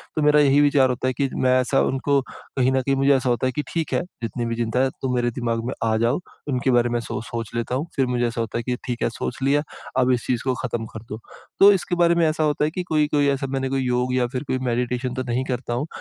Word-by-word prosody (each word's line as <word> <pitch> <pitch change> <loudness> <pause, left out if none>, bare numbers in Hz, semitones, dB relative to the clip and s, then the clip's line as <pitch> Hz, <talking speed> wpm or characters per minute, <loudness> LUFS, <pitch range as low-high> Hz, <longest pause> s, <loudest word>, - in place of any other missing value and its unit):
तो 155 - 0
मेरा 150 0 +5
यही 145 0 +5
विचार 140 -2 +4
होता 125 +1 -1
है 130 - +1
कि 135 +1 -1
मैं 130 0 +3
ऐसा 130 +2 +2
उनको 140 +1 +1
कहीं 130 -1 -1
न 130 0 +2
कहीं 135 +1 0
मुझे 135 +1 +4
ऐसा 130 -1 0
होता 120 +2 +1
है - - 0
कि 150 - 0
ठीक 165 -2 -2
है, - - +2 0.2
जितनी 120 +2 -3
भी 115 0 -2
चिंता 115 +1 -1
है, 135 - +3
तुम 130 -1 -1
मेरे 120 -1 +1
दिमाग 115 -1 -2
में 130 - -2
आ 110 -1 +2
जाओ, 115 +6 +1 0.3
उनके 130 -1 +1
बारे 120 -1 +3
में 120 0 0
सो 115 - -4
सोच 115 -1 -5
लेता 120 +1 -1
हूँ। 150 +6 -2
फिर 135 - +3
मुझे 125 -1 0
ऐसा 115 0 -3
होता 115 - -3
है 120 - -3
कि 125 +1 -1
ठीक 120 -2 -4
है, - - +2
सोच 115 +1 -5
लिया, 145 +2 +3 0.4
अब 130 0 +3
इस 120 -2 0
चीज़ 120 -2 0
को 130 -1 +1
खत्म 120 -3 -3
कर 110 0 -8
दो। 110 - -5 0.4
तो 200 +1 +9
इसके 180 -1 -1
बारे 170 -1 +4
में 170 -1 +3
ऐसा 155 0 0
होता 150 -1 +1
है 155 - -1
कि 180 +2 -3
कोई-कोई 150 -2 +2
ऐसा 135 0 -1
मैंने 135 0 -1
कोई 135 0 0
योग 125 0 0
या 125 -1 +2
फिर 130 +2 -2
कोई 130 - -1
मेडिटेशन 125 +1 -1
तो 130 0 -3
नहीं 120 +2 0
करता 125 -2 -3
हूँ, 140 +6 -2
130 Hz, 280 wpm, -23 LUFS, 120-140 Hz, 0.4 s, तो